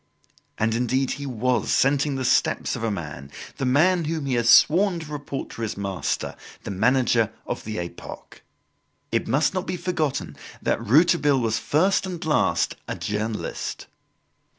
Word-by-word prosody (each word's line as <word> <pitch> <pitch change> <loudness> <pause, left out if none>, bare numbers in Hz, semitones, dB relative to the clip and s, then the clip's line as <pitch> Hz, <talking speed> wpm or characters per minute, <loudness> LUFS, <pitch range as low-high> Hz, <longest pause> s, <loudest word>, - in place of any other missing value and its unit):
And, 110 +1 +1
indeed, 125 +3 0
he 140 0 -5
was 125 -1 0
scenting 140 +1 +2
the 130 -1 -2
steps - - +1
of - - -6
a 115 - +1
man, 75 -8 -6 0.3
the 135 - -1
man 165 +6 +3
whom 155 -1 -2
he 135 - -1
has 120 -1 +2
sworn 180 +2 +5
to 155 -2 -9
report 145 -2 -5
to - - -8
his 110 -3 -3
master, 100 -2 -3 0.3
the - - -5
manager 115 +1 +2
of - - -4
the 110 0 -4
"Epoque." 85 0 -8 0.7
It - - 0
must 150 +5 +2
not 185 -1 -3
be 180 - -2
forgotten 160 -6 -2 0.2
that - - -1
Rouletabille 145 - +4
was 115 -2 0
first 190 +5 +2
and 180 -2 -6
last 85 - +1
a - - -3
journalist. 105 +1 -4
130 Hz, 160 wpm, -24 LUFS, 110-155 Hz, 0.7 s, sworn